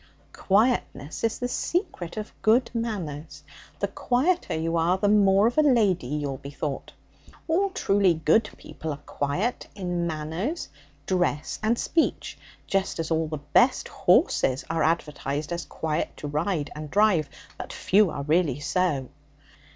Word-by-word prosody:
'Quietness 205 - 0
is 225 -1 +1
the 245 - -2
secret 250 - -2
of 215 0 -5
good 235 +3 +3
manners. 185 -11 -4 0.4
The - - +2
quieter 300 - 0
you 165 +1 -1
are, 170 +3 +2
the 205 - +1
more 200 -1 +5
of 240 +6 +2
a - - +8
lady 220 - +3
you'll 145 -1 -3
be 140 - -8
thought. 145 -1 -5 0.6
All 370 +5 +2
truly 195 - +2
good 160 +8 +2
people 160 - -8
are 145 0 -7
quiet 160 - -2
in 175 -3 -2
manners, 165 - -3 0.4
dress, 175 -4 -1
and 220 +2 +1
speech, 325 +5 0 0.3
just 195 0 -1
as 165 0 -3
all 160 0 +1
the 155 0 -4
best 145 0 +2
horses 130 +1 +2
are 165 -1 0
advertised 150 -2 -1
as 170 -1 -3
quiet 155 -1 -3
to 150 - -6
ride 150 +1 -1
and 150 0 -7
drive, 200 -5 +3 0.3
but - - -6
few 200 0 +3
are 140 - -4
really 150 -2 +1
so.' 145 -4 0
175 Hz, 150 wpm, -26 LUFS, 150-215 Hz, 0.6 s, a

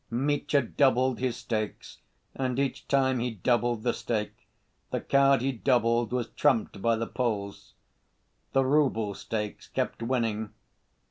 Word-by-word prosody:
Mitya 140 +3 +1
doubled 130 0 +2
his 125 -2 -1
stakes, 110 -3 -4 0.3
and 130 -2 -2
each 140 -1 -2
time 130 -2 +2
he 125 +1 -1
doubled 120 +1 0
the 120 - +1
stake, 105 -3 -4 0.4
the - - -1
card 140 -1 +3
he 135 +2 +1
doubled 120 -2 +1
was 120 -2 -1
trumped 120 -9 +1
by 115 +1 +3
the 115 +1 -2
Poles. 105 -6 -3 0.8
The 135 0 +3
rouble 130 -7 +2
stakes 105 0 -5
kept - - -3
winning. 115 -3 -1
120 Hz, 135 wpm, -28 LUFS, 115-130 Hz, 0.8 s, card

